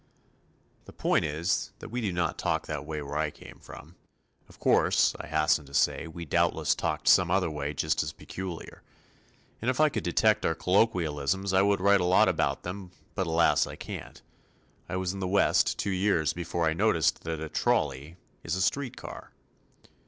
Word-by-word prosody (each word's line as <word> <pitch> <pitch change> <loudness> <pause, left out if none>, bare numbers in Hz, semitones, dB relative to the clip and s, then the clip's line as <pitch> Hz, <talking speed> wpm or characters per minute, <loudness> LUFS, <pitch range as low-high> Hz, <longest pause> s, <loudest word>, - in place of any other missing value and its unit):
The - - -13
point - - +1
is, 80 +4 -1
that - - -10
we 125 +2 -3
did 100 -5 -2
not 85 - -1
talk - - -1
that 75 -1 -5
way 75 -2 -4
where 70 +1 -5
I 80 -1 0
came - - -14
from. 80 +5 -13 0.5
Of - - -17
course, - - +3
I - - -7
hasten 75 -1 +1
to 70 - -9
say, - - +1
we 85 +1 -8
doubtless 75 - +1
talked - - -3
some 90 -1 +6
other 90 -2 +1
way 75 -1 -4
just 80 +2 0
as 75 - -3
peculiar. 90 0 -8 0.8
And 115 - 0
if 130 - -1
I 155 0 +5
could 110 -7 -3
detect 110 +5 +2
our 80 - +1
colloquialisms 90 -2 +1
I 95 - +5
would 100 -1 +2
write 100 0 +4
a - - +1
lot 90 +1 +5
about - - 0
them 90 +1 -6 0.2
but 95 -3 -2
alas 80 +1 +3
I - - -8
can't. - - -9 0.7
I - - -3
was 95 0 -1
in 100 - -6
the 95 - -2
West 100 +1 +2
two 100 - -2
years 90 -5 +1
before 85 -1 -2
I 80 - +2
noticed 80 - +2
that 80 -1 -3
a 80 - -4
"trolley" 75 +2 -1 0.3
is 85 - -2
a 95 - -2
"street 140 +3 -1
car." - - -9
85 Hz, 190 wpm, -28 LUFS, 80-95 Hz, 0.8 s, some